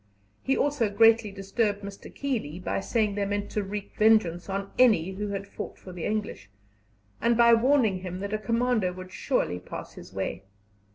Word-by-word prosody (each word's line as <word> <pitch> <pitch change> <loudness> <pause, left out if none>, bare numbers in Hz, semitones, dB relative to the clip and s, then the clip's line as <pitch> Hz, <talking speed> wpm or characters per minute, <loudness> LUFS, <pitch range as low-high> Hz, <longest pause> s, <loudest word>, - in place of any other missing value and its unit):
He 270 - +1
also 280 -7 +1
greatly 225 +1 +4
disturbed 200 +1 -1
Mr. 200 0 -9
Keeley 230 - -3
by 100 - -2
saying 210 - 0
they 200 0 -1
meant 205 0 -2
to 210 - 0
wreak 200 +1 -5
vengeance 215 -5 +3
on 195 0 -3
any 210 -8 +5
who 205 +2 -4
had 200 0 -4
fought - - -7
for 185 - -11
the 175 -2 -5
English, 205 - -3 0.7
and 235 0 +3
by 235 0 +7
warning 230 -5 +3
him 180 0 -6
that 200 +1 -4
a 215 - 0
commando 230 -4 +1
would 185 0 -9
surely 190 - -1
pass - - -8
his 90 +2 -12
way. 95 0 -3
205 Hz, 180 wpm, -27 LUFS, 185-230 Hz, 0.7 s, by